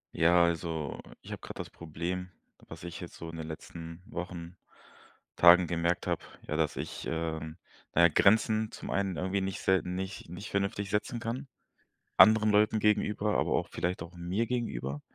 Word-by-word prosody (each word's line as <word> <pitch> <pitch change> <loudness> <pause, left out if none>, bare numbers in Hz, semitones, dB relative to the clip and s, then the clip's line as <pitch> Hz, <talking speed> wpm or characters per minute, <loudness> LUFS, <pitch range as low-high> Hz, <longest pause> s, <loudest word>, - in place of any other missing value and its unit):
Ja, 85 +1 +5
also, 80 -3 -1 0.2
ich - - -11
habe - - -5
gerade - - -9
das - - -5
Problem, 85 +3 -5 0.4
was - - -10
ich 85 0 -6
jetzt 90 - -8
so 85 - -7
in 80 - -8
den 80 -1 -5
letzten 80 +1 -8
Wochen, 90 -3 -6 0.8
Tagen 90 +1 +8
gemerkt 85 +1 0
habe, - - 0 0.3
ja, 75 - -1
dass 80 -3 +1
ich, - - -5
ähm 80 -1 -3 0.4
na 85 - +6
ja, - - +10
Grenzen 110 +5 +3
zum - - -8
einen 95 -3 0
irgendwie 95 +2 0
nicht 95 0 -3
selten 90 -1 +1
nicht 95 -2 -5
nicht 90 +4 -7
vernünftig 100 0 -1
setzen 105 +4 -1
kann 120 +5 -4 0.7
anderen 110 0 +7
Leuten 105 +1 +4
gegenüber, 105 0 +2
aber - - +1
auch - - 0
vielleicht 90 -1 -2
auch 85 +2 -10
mir 90 +7 -1
gegenüber. 75 - -3
90 Hz, 175 wpm, -30 LUFS, 85-100 Hz, 0.8 s, ja